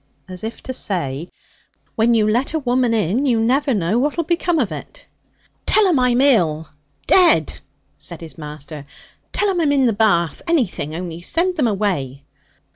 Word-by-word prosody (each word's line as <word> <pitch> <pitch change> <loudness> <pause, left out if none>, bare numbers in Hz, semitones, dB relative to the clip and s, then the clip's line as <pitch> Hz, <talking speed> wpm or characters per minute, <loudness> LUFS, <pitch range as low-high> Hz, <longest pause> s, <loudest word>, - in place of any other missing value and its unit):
as 185 +1 -9
if 225 +1 -6
to 260 - -5
say, 170 - -3 0.7
'When 230 +1 +3
you 215 -2 +2
let 245 +8 0
a - - +1
woman 250 -3 +1
in 220 - 0
you 235 -3 +2
never 265 +5 +1
know 205 0 +1
what'll 295 +5 0
become 340 +1 0
of 235 - 0
it.' 150 - -9 0.6
'Tell 430 -2 +5
'em 335 -7 +2
I'm 250 0 +2
ill 165 - +2 0.4
dead!' 340 - +4 0.4
said 170 -1 -7
his 165 -2 -9
master. 150 -2 -9 0.4
'Tell 410 -1 +1
'em 355 -2 -1
I'm 300 -3 +2
in 275 -2 +3
the 235 - +2
bath 185 -7 +1
anything, 230 - -1
only 170 -1 -6
send 350 - 0
them 290 -7 +1
away!' 180 - -2
225 Hz, 170 wpm, -19 LUFS, 170-275 Hz, 0.7 s, Tell